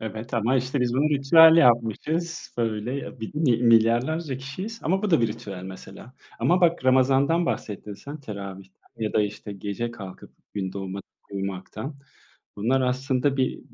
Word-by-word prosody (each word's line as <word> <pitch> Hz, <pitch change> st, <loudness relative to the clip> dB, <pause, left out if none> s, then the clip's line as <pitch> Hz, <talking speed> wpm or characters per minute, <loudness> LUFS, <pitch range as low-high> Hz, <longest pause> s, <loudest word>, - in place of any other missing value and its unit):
Evet 110 Hz, +1 st, -6 dB
ama 120 Hz, +3 st, +2 dB
işte 130 Hz, +2 st, -1 dB
biz 120 Hz, -1 st, 0 dB
bunu 145 Hz, +4 st, +2 dB
ritüel 160 Hz, +4 st, +7 dB
yapmışız. 150 Hz, +6 st, +1 dB
Böyle 120 Hz, +3 st, -3 dB
bir 110 Hz, -, -6 dB
mil 135 Hz, -7 st, +2 dB
milyarlarca 120 Hz, +6 st, +3 dB
kişiyiz. 185 Hz, -, -7 dB
Ama 190 Hz, +5 st, 0 dB
bu 210 Hz, -, 0 dB
da 165 Hz, -, +4 dB
bir 115 Hz, -, +2 dB
ritüel 100 Hz, -3 st, -7 dB
mesela. 95 Hz, +6 st, -11 dB, 0.2 s
Ama 180 Hz, +2 st, +2 dB
bak 170 Hz, -5 st, +2 dB
Ramazan'dan 135 Hz, +6 st, +3 dB
bahsettin 105 Hz, -, -4 dB
sen, 140 Hz, +9 st, -9 dB
teravihten 100 Hz, -5 st, -9 dB
ya 110 Hz, -1 st, -2 dB
da 110 Hz, -, +3 dB
işte 105 Hz, 0 st, -5 dB
gece 100 Hz, +4 st, -4 dB
kalkıp 100 Hz, -5 st, -10 dB, 0.2 s
gün 95 Hz, -2 st, -3 dB
doğmadan 95 Hz, 0 st, -5 dB, 0.3 s
uyumaktan. 100 Hz, +7 st, -5 dB, 0.6 s
Bunlar 120 Hz, +6 st, +1 dB
aslında 130 Hz, +1 st, 0 dB
bir, 130 Hz, -1 st, 0 dB
125 Hz, 155 wpm, -25 LUFS, 105-140 Hz, 0.6 s, ritüel